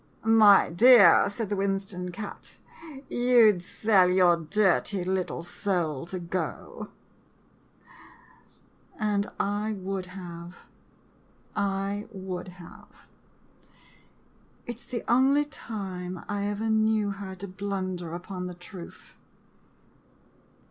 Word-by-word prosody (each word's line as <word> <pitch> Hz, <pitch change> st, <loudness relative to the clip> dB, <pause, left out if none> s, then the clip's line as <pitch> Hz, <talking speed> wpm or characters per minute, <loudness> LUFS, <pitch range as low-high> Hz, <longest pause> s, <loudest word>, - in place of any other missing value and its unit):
"My 215 Hz, -4 st, +6 dB
dear," 205 Hz, -1 st, +7 dB
said 205 Hz, 0 st, -4 dB
the 205 Hz, -, -1 dB
Winston 195 Hz, -2 st, -2 dB
cat, 205 Hz, +3 st, -9 dB, 0.3 s
" -, -, -11 dB, 0.2 s
you 240 Hz, -3 st, +5 dB
'd 180 Hz, -, -7 dB
sell 190 Hz, 0 st, +2 dB
your 180 Hz, -1 st, +5 dB
dirty 190 Hz, +2 st, +1 dB
little 185 Hz, -2 st, -2 dB
soul 170 Hz, -6 st, -2 dB
to 185 Hz, -, -5 dB
go! 180 Hz, +1 st, -5 dB, 1.0 s
" -, -, -25 dB
And 210 Hz, -2 st, 0 dB
I 205 Hz, +2 st, -1 dB
would 190 Hz, -1 st, -4 dB
have 175 Hz, -1 st, -9 dB, 0.6 s
— -, -, -35 dB
I 200 Hz, +1 st, -2 dB
would 185 Hz, -1 st, -6 dB
have. 180 Hz, -1 st, -14 dB, 1.6 s
It 240 Hz, -, -6 dB
's -, -, -13 dB
the 240 Hz, -2 st, -4 dB
only 270 Hz, +4 st, +4 dB
time 185 Hz, -, -7 dB
I 205 Hz, 0 st, -2 dB
ever 210 Hz, +2 st, -2 dB
knew 220 Hz, -1 st, +2 dB
her 195 Hz, -1 st, -7 dB
to 195 Hz, +2 st, -7 dB
blunder 185 Hz, -3 st, -4 dB
upon 180 Hz, +1 st, -6 dB
the 180 Hz, -, -8 dB
truth. 175 Hz, 0 st, -12 dB
195 Hz, 115 wpm, -27 LUFS, 180-210 Hz, 1.6 s, dear